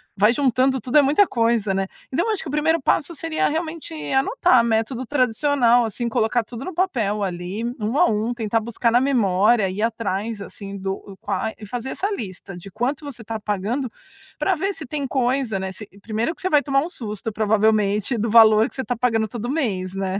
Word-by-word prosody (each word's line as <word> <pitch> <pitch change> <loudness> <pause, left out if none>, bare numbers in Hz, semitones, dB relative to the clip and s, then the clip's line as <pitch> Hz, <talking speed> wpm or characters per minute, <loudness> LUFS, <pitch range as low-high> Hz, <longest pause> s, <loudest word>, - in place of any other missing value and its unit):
vai 210 +4 +4
juntando 260 0 +2
tudo, 255 +4 +1
é - - +9
muita 290 +9 +4
coisa, 230 - +1
né? 195 0 -1 0.2
Então, 275 +6 +1
eu 445 - +1
acho 405 - -3
que - - -7
o - - -4
primeiro 310 +2 +1
passo 325 +5 0
seria 320 +1 0
realmente 320 - -4 0.2
anotar, 280 - +3
método 230 +3 -1
tradicional, 250 -1 +3
assim, 235 +2 -3
colocar 225 +1 +1
tudo 235 +3 -8
no 370 - -5
papel 235 - 0
ali, 180 +3 -4 0.2
1 220 +5 -1
a 355 - +5
1, 220 +3 -1
tentar 225 -1 0
buscar 230 +1 -1
na 240 - +5
memória, 215 -5 +3
ir 190 +3 -4
atrás, 220 -1 -2
assim, 200 0 -8
do 195 +1 -5
a - - -30
qua 210 +2 -1
e 215 - -10
fazer 245 +4 -5
essa 400 +2 -2
lista 195 - -6
de 180 +3 -10
quanto 255 - -2
você 255 -5 -7
tá 225 0 -5
pagando 210 +6 -2 0.5
pra 385 - +1
ver 385 +4 -1
se - - -8
tem 285 +1 -3
coisa, 250 -5 0
né, 190 0 -3
se 210 +2 -9
E 195 - -19
primeiro 220 - -2
que - - -12
você 375 - 0
vai 295 -3 +4
tomar 275 -1 +1
um 330 - -5
susto, 220 - -5
provavelmente, 215 +1 +2
do 225 +1 -1
valor 220 0 +7
que - - -11
você 265 - -3
tá 245 -2 -3
pagando 225 -2 +1
todo 240 +1 -5
mês, 195 - -2
né? 195 0 -2
230 Hz, 215 wpm, -22 LUFS, 210-275 Hz, 0.5 s, é